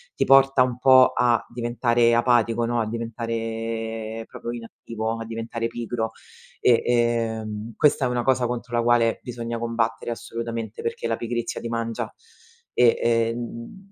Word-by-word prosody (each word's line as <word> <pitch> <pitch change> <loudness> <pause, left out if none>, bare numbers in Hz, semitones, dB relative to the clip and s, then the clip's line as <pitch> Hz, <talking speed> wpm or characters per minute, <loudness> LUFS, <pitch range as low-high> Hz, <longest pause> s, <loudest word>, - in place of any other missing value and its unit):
ti - - +1
porta 135 -1 +6
un 125 -1 -3
po' 130 -1 +7
a 120 -1 +2
diventare 120 0 +2
apatico, 120 -1 +2
no, 120 0 0
a 110 - -2
diventare 115 -1 -4
proprio - - -8
inattivo, 115 -1 -5
a 115 - -5
diventare 115 +1 -4
pigro. 115 -1 -4 0.5
E, 120 -2 +4
ehm, 115 -2 -1
questa 145 0 +3
è - - +2
una 120 -1 -1
cosa 130 -1 +2
contro 120 0 -4
la 120 - +3
quale 115 -1 +3
bisogna 115 -1 -5
combattere 115 0 -1
assolutamente, 115 -1 -5
perché 115 - -4
la 115 - 0
pigrizia 120 0 -3
ti - - -4
mangia 115 -1 -3 0.6
e, 120 -1 +4
ehm, 115 +10 -2
115 Hz, 145 wpm, -24 LUFS, 115-120 Hz, 0.6 s, po